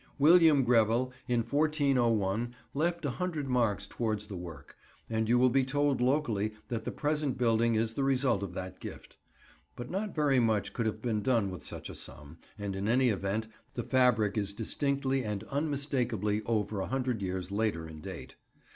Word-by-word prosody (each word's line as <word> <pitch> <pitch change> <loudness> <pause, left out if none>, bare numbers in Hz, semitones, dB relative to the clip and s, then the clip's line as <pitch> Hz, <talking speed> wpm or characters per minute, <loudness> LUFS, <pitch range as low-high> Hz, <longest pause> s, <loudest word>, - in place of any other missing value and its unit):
William 155 -1 +6
Grevel 120 +1 +3
in 120 -1 +2
1401 120 -6 +1 0.2
left 170 +3 0
a - - +1
hundred 160 -2 -3
marks 120 -5 +1
towards 110 -3 -2
the 105 -2 -8
work, 80 -5 -9 0.4
and 110 0 0
you 120 - +5
will 125 0 +4
be 135 +1 +3
told 145 0 +1
locally 120 -6 +1
that 115 -2 -3
the - - -2
present 150 -3 -1
building 115 -1 +2
is 110 0 +1
the 135 - -1
result 135 -6 +2
of 95 -3 -5
that 95 -1 -6
gift. - - -9 0.6
But 120 0 -7
not 200 +3 -3
very 145 -4 +3
much 110 -4 +1
could 115 -2 -1
have 110 0 -4
been 110 -4 0
done 115 -5 +1
with 90 -5 -8
such - - -6
a - - -8
sum, 75 +2 -10 0.2
and 100 -2 -4
in 100 +2 -2
any 125 +2 +4
event, 100 +1 -1 0.3
the 120 - -2
fabric 115 -5 +3
is 100 -1 -3
distinctly 135 +4 -1
and 105 -3 -3
unmistakably 130 -8 0
over 105 -3 0
a 95 - -3
hundred 130 -4 -1
years 95 -1 -3
later 100 -6 -1
in 80 -1 -10
date. - - -8
115 Hz, 180 wpm, -31 LUFS, 105-135 Hz, 0.6 s, William